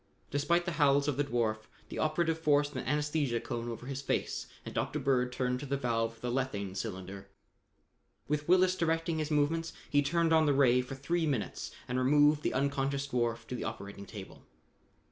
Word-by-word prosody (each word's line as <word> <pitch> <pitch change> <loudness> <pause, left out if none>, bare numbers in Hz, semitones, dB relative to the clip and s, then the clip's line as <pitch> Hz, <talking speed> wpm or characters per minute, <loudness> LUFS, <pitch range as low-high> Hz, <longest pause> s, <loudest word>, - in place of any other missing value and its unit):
Despite 170 +5 +2
the 175 - -1
howls 140 0 +4
of 145 - +1
the 145 - +2
dwarf, 110 -5 -1 0.2
the - - -5
operative 160 +1 +1
forced 145 -2 +2
an 130 - -2
anesthesia 150 -3 0
cone 120 -1 -4
over 115 +1 -6
his 135 0 -4
face 140 - -2 0.2
and - - -6
Dr. - - -1
Bird 130 -3 +1
turned 125 0 -1
to 145 - -6
the 140 +1 0
valve 115 -3 0
of 115 - -21
the 125 - -2
lethane 110 -7 -2
cylinder. 95 +1 -6 1.0
With 150 +2 -1
Willis 185 0 +5
directing 165 -1 0
his 155 -1 -2
movements, 160 +2 +1 0.2
he 145 - +5
turned 165 +3 +2
on 160 -1 +5
the 145 - +3
ray 125 -2 +5
for 125 +2 -7
three 165 +5 0
minutes 130 -8 -2 0.2
and 125 +1 -1
removed 145 +3 +4
the - - -1
unconscious 140 0 0
dwarf 120 -3 -1
to - - -7
the 125 - -3
operating 100 0 -6
table. 100 -3 -9
140 Hz, 190 wpm, -31 LUFS, 120-150 Hz, 1.0 s, Willis